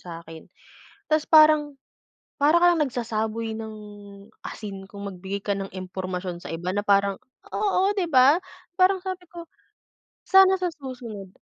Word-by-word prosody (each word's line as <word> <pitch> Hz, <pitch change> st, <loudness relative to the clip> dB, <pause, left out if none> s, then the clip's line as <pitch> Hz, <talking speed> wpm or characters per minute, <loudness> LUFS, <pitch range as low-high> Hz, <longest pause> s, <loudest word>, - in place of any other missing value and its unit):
sa 170 Hz, -1 st, -9 dB
akin. 160 Hz, -1 st, -12 dB, 0.6 s
Tapos 310 Hz, -1 st, +1 dB
parang, 310 Hz, -1 st, +7 dB, 0.8 s
para 305 Hz, +4 st, +5 dB
kang 345 Hz, -2 st, +4 dB
nagsasaboy 225 Hz, -3 st, -3 dB
ng 220 Hz, 0 st, -7 dB, 0.7 s
asin 200 Hz, -3 st, -7 dB
kung 200 Hz, 0 st, -8 dB
magbigay 190 Hz, +1 st, -5 dB
ka 200 Hz, 0 st, -2 dB
ng 195 Hz, 0 st, -5 dB
impormasyon 185 Hz, -1 st, -6 dB
sa -, -, -8 dB
iba, 175 Hz, +3 st, -4 dB
na 205 Hz, -, 0 dB
parang 200 Hz, -1 st, +2 dB, 0.4 s
oo, 400 Hz, -1 st, +1 dB
di 360 Hz, -5 st, -2 dB
ba? 275 Hz, +6 st, +5 dB, 0.3 s
Parang 375 Hz, +1 st, +3 dB
sabi 370 Hz, -1 st, -6 dB
ko, 340 Hz, -1 st, -10 dB, 0.8 s
sana 380 Hz, 0 st, +6 dB
sa 365 Hz, -, 0 dB
susunod 245 Hz, -9 st, -9 dB
225 Hz, 140 wpm, -24 LUFS, -, 0.8 s, parang